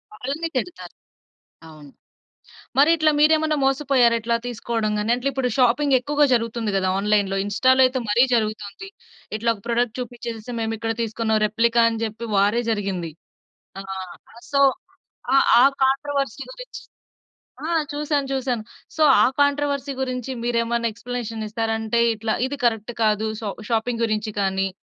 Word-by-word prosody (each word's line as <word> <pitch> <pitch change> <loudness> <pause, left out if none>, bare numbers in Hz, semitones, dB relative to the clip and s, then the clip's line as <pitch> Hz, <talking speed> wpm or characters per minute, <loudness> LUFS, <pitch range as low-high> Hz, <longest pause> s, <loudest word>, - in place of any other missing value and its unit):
వాళ్ళనే 280 +9 -3
తిడతారు. 355 +8 -5 0.8
అవును. 150 -3 -14 0.9
మరి 285 +3 +6
ఇట్లా 310 -1 +3
మీరేమైనా 310 0 +4
మోసపోయారా? 270 -3 +3
ఇట్లా 235 +1 0
తీసుకోవడం 230 -2 -2
గాని 210 +3 0
అంట్లే 250 +3 -1
ఇప్పుడు 255 -2 -1
షాపింగ్ 260 +3 +3
ఎక్కువగా 295 +3 +2
జరుగుతుంది 230 -2 -1
కదా 190 -1 +1
ఆన్‌లైన్‌లో. 200 -1 +1
ఇన్‌స్టాలో 260 +6 +3
అయితే 255 0 0
మరీ 235 +4 +5
జరుగుతుంది. 215 - -2 0.5
ఇట్లా 230 +2 -1
ఒక 205 - -14
ప్రొడక్ట్ 235 -1 0
చూపించేసి 235 -1 -6
మేము 225 0 -2
ఇక్కడ 225 +1 -2
తీసుకున్నాం. 220 -1 0
రెప్లికా 230 +2 +2
అని 225 - -4
చెప్పి 225 +1 -4
వారే 205 +4 +3
జరిగింది. 195 -6 -2 0.7
ఆ! - - -6 0.7
సో 280 - +3 1.0
ఆ - - +7 0.2
కాంట్రోవర్సీ 275 +1 -1
గురించి - - -10 0.9
ఆ! - - -2 0.2
చూసాను 290 -1 -1
చూసాను. 255 -4 -1 0.3
సో 315 - +1 0.2
ఆ - - +6 0.2
కాంట్రోవర్సీ 285 -1 +1
గురించి 255 -1 -4
మీరేమన్నా 235 0 0
ఎక్స్‌ప్లనేషన్ 235 -1 -5
ఇస్తారా? 225 0 -2
అంటే 225 +1 0
ఇట్లా 220 0 -2
ఇది 285 - -4
కరెక్ట్ 225 -1 0
కాదు. 215 0 +2
సా 215 - -4 0.2
షాపింగ్ 230 +1 0
గురించి 215 -1 -1
కానీ 195 0 0
235 Hz, 140 wpm, -22 LUFS, 220-265 Hz, 1.0 s, ఆ